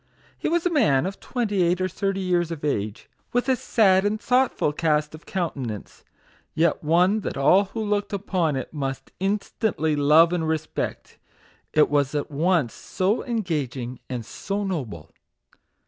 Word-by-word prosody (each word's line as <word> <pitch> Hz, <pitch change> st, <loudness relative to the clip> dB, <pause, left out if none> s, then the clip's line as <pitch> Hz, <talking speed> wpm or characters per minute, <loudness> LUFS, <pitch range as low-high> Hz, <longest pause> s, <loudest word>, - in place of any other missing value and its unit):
He -, -, -2 dB
was 340 Hz, +1 st, +1 dB
a 355 Hz, -, +2 dB
man 150 Hz, -, +3 dB
of 190 Hz, +1 st, -4 dB
twenty 215 Hz, -6 st, -1 dB
eight 175 Hz, +1 st, +2 dB
or 185 Hz, -, +1 dB
thirty 195 Hz, +1 st, -2 dB
years 175 Hz, -2 st, +1 dB
of 160 Hz, -3 st, -5 dB
age, 110 Hz, -5 st, -2 dB, 0.3 s
with 245 Hz, +2 st, +1 dB
a 260 Hz, -, +4 dB
sad 195 Hz, -6 st, +3 dB
and 210 Hz, +1 st, 0 dB
thoughtful 250 Hz, -, +1 dB
cast 150 Hz, -2 st, +1 dB
of 155 Hz, -, -12 dB
countenance, 135 Hz, -, -4 dB, 0.5 s
yet 160 Hz, -1 st, +2 dB
one 180 Hz, +7 st, +3 dB
that 205 Hz, -, -4 dB
all 185 Hz, +9 st, +5 dB
who 220 Hz, +3 st, -5 dB
looked 205 Hz, 0 st, -1 dB
upon 185 Hz, -6 st, 0 dB
it 130 Hz, +3 st, -5 dB
must 135 Hz, -3 st, -4 dB
instantly 195 Hz, -4 st, 0 dB
love 155 Hz, +4 st, +5 dB
and 165 Hz, -2 st, 0 dB
respect; 160 Hz, 0 st, -3 dB, 0.5 s
it 155 Hz, -, +4 dB
was 145 Hz, -1 st, +1 dB
at 145 Hz, +1 st, -2 dB
once 155 Hz, -3 st, +1 dB
so 195 Hz, +4 st, -1 dB
engaging 145 Hz, -, -3 dB
and 120 Hz, -3 st, -4 dB
so 200 Hz, -, -4 dB
noble. 115 Hz, -, -4 dB
170 Hz, 160 wpm, -24 LUFS, 145-200 Hz, 0.5 s, all